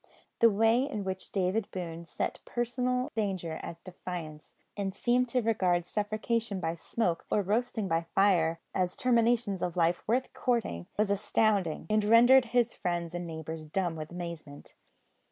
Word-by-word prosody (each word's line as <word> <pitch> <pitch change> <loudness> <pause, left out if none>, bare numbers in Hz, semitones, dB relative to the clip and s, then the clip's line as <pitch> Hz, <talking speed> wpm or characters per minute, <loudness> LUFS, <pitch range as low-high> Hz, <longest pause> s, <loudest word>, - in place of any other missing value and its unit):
The 230 - +7
way 225 +3 +3
in 215 -7 -3
which 190 -1 -4
David 195 +2 0
Boone 170 -2 -6
set - - -3
personal 250 +1 -1
danger 185 -7 -2
at 170 0 -8
defiance, 175 -4 -8 0.2
and 195 -1 -3
seemed 245 +3 +2
to 250 0 +1
regard 185 -6 +1
suffocation 215 +1 -1
by 165 -2 -1
smoke 170 +1 -2
or 205 - +2
roasting 220 +1 0
by 165 -1 0
fire 170 -5 +3
as 180 -1 0
terminations 235 -5 +2
of 180 0 -2
life 170 0 +2
worth 250 +4 0
courting, 225 - -1
was 210 -1 +2
astounding, 200 -5 +1
and 215 +2 +2
rendered 245 +4 +7
his 240 0 +1
friends 175 -2 -3
and 175 0 -4
neighbours 160 0 -6
dumb 170 +2 -2
with 155 -1 -6
amazement. 170 -5 -8
195 Hz, 155 wpm, -30 LUFS, 170-230 Hz, 0.2 s, The